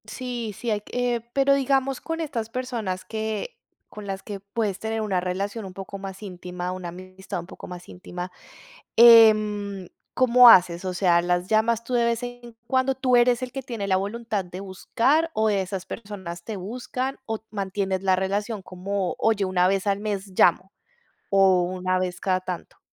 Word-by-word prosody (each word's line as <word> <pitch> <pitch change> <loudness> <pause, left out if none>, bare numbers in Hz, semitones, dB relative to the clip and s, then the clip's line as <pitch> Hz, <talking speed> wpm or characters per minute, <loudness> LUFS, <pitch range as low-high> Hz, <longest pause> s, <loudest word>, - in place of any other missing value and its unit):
Sí, 240 -1 -5
sí 235 - -3
hay 210 -1 0
que 245 +1 -2
pero 275 0 +4
digamos, 270 -1 +1
con 325 0 -4
estas 240 -8 -3
personas 230 -7 -4
que 220 - -4 0.3
con 210 -1 -10
las 195 0 -5
que 205 -2 -6
puedes 200 0 -3
tener 220 0 -2
una 200 -4 0
relación 195 +4 -3
un 190 - -9
poco 195 +1 -7
más 195 +1 -8
íntima, 180 -1 -6
una 185 -1 -5
amistad 185 +1 -7
un - - -11
poco - - -11
más 180 -1 -9
íntima, 180 0 -7 0.7
em, 215 -4 +6 0.3
¿cómo 250 -1 +7
haces? 175 -4 +6
O 185 -1 -3
sea, 175 -2 +3
¿las 175 +1 0
llamas 225 +2 +2
tú 250 - -6
de 240 -1 +3
vez 235 +1 0
en 245 -1 -8
cuando? 260 +1 +1
¿Tú 255 -1 +2
eres 240 0 +4
el 250 - -5
que 270 - -5
tiene 230 -6 -5
la 190 -1 +3
voluntad 210 +1 -3
de 180 +1 -9
buscar 235 - +1
o 220 0 +2
esas 190 -2 -2
personas 190 -6 -7
te 215 +2 -5
buscan? 250 +6 -4
O 220 -1 -2
mantienes 195 -2 -2
la 190 -1 +4
relación 200 +3 -2
como, 185 +1 -3
oye, 215 -3 +2
una 180 -1 +2
vez 195 +1 0
al 200 0 +1
mes 205 -2 -3
llamo 185 +2 +3 0.6
o 190 -2 +5
una 185 +1 -1
vez 180 -1 -3
cada 185 -1 +1
tanto. 180 -1 -7
205 Hz, 180 wpm, -24 LUFS, 185-235 Hz, 0.7 s, cómo